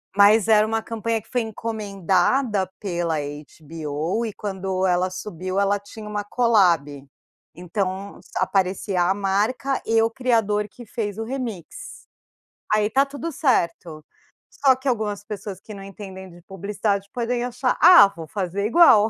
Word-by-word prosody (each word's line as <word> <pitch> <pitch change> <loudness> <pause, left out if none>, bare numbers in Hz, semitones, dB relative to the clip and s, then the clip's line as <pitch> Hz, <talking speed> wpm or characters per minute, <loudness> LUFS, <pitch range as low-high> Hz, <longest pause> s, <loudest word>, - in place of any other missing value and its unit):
Mas 205 +2 +6
era 215 -1 +5
uma 225 0 -1
campanha 230 0 -2
que - - -26
foi 245 -1 0
encomendada 210 -1 0
pela 175 -4 -2 0.4
HBO, 155 +6 -3
e 220 - -3
quando 190 -2 -3
ela 180 0 +2
subiu, 185 0 -4
ela 200 0 +2
tinha 210 +1 -11
uma 210 -1 -3
colab. 180 - +2 0.5
Então, 190 +2 -4 0.2
aparecia 190 0 0
a 180 +2 +2
marca 210 +7 0
e 225 0 +3
o 225 - +1
criador 225 -4 +1
que 240 +2 -13
fez 210 -2 -4
o 225 - -3
remix, 245 - -7 0.7
aí 210 0 +2
tá 270 +5 +3
tudo 285 +4 -6
certo, 170 - 0 0.5
só 270 -2 +3
que 260 +2 -8
algumas 210 -4 -1
pessoas 205 -3 -7
que 215 - -10
não 195 -1 -9
entendem 190 -1 -9
de 175 0 -15
publicidade, 200 +1 -2
podem 240 0 -1
achar: 250 +1 -1
“Ah, 350 - +9
vou 165 -1 -8
fazer 200 0 -3
igual!”, 225 -5 +6
205 Hz, 150 wpm, -23 LUFS, 185-225 Hz, 0.7 s, Ah